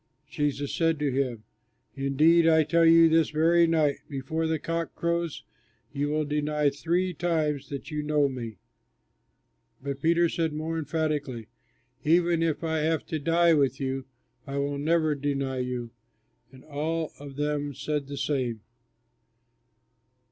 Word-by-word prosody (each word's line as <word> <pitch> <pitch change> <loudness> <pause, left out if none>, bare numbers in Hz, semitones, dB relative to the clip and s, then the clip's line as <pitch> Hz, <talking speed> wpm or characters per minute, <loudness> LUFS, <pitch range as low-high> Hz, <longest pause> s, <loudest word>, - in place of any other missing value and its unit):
Jesus 145 -1 -2
said 165 -1 +1
to 145 -2 0
him, 125 -4 -1 0.5
"Indeed 155 +5 +3
I 160 -1 +5
tell 165 +2 +3
you, 165 0 +7
this 160 -1 +3
very 165 +2 +4
night 155 -3 +2
before 150 +4 -2
the 160 0 0
cock 165 +2 -3
crows 170 -2 -2 0.5
you 145 +1 -1
will 155 0 0
deny 150 0 0
three 175 +5 -1
times 155 -5 -1
that 140 +2 -6
you 150 0 -2
know 150 -1 +2
me." 120 -5 -6 1.2
But 140 0 -5
Peter 170 +1 +3
said 165 -1 -1
more 160 +2 -3
emphatically, 145 -7 -2 0.5
"Even 170 +1 +3
if 165 -1 0
I 160 -1 0
have 160 +1 0
to 160 - -2
die 165 +2 +3
with 135 -4 +2
you, 135 -1 -3 0.4
I 140 0 -4
will 140 0 -1
never 155 +1 +2
deny 140 -2 -2
you." 125 -2 -3 0.6
And 130 -1 -15
all 155 +2 -2
of 140 -1 -9
them 145 -1 -2
said 150 0 -3
the 140 0 -6
same. 125 -7 -1
150 Hz, 145 wpm, -27 LUFS, 140-165 Hz, 1.2 s, you